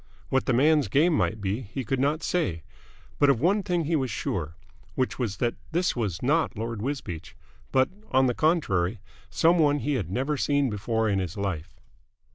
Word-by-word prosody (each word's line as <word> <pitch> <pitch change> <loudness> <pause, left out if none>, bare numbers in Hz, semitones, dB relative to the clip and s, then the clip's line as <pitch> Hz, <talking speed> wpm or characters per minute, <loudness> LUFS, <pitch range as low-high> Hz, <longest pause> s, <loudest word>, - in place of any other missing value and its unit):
What 135 -1 +1
the - - +3
man's 145 +2 +4
game 150 - +3
might 110 -7 0
be, 100 +5 -1
he 125 +4 -5
could 135 +4 -1
not 145 +4 +1
say; 95 - -1 0.6
but 145 - +5
of 135 -5 +3
one 190 - +3
thing 175 -3 0
he 165 +2 +1
was 135 -4 0
sure, 85 -7 -3 0.4
which 130 0 -1
was 110 -6 -2
that 120 -1 0 0.2
this 175 +2 +1
was 105 -7 -2
not 150 -2 +1
Lord 115 -1 -4
Wisbeach, 115 - -5 0.4
but 130 0 +4 0.2
on 130 0 +4
the 125 - +2
contrary 115 - +1 0.3
some 165 +10 +3
one 145 -2 +4
he 145 +1 -1
had 105 - -2
never 135 +9 -1
seen 140 -2 +1
before 110 +2 -1
in 100 -2 +1
his 90 +1 -4
life. 95 -6 -4
130 Hz, 190 wpm, -26 LUFS, 100-145 Hz, 0.6 s, but